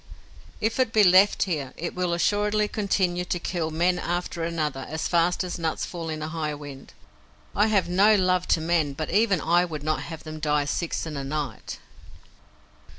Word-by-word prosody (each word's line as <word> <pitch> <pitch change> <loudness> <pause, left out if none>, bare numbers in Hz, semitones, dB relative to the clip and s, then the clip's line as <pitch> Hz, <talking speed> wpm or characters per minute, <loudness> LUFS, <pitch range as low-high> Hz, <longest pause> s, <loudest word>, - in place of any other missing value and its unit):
If 225 +4 -1
it 255 -3 +2
be 215 -2 +5
left 190 +2 +5
here, 150 -8 -3
it 170 - -4
will 180 -1 -1
assuredly 210 +3 +1
continue 190 -4 0
to 180 - -1
kill 170 -2 -2
men 175 +3 +1
one - - -5
after 175 -1 -2
another 155 -5 -2
as 155 0 -2
fast 175 +1 +2
as 180 -1 -5
nuts 160 -1 -2
fall 165 -2 -6
in 155 -1 -4
a 155 - -4
high 155 -2 -3
wind. 145 -2 -10 0.6
I 210 +2 +4
have 205 -4 +2
no 200 +5 +5
love 185 -2 +1
to 160 - +2
men, 160 -3 +1
but 155 +3 -4
even 200 -1 +3
I 175 +3 +3
would 155 -4 -5
not 155 0 -1
have 160 -2 -8
them 155 0 -7
die 150 -1 +1
six 165 +4 -2
in 155 -2 -6
a 140 - -4
night." 140 -4 -4
170 Hz, 195 wpm, -25 LUFS, 155-185 Hz, 0.6 s, be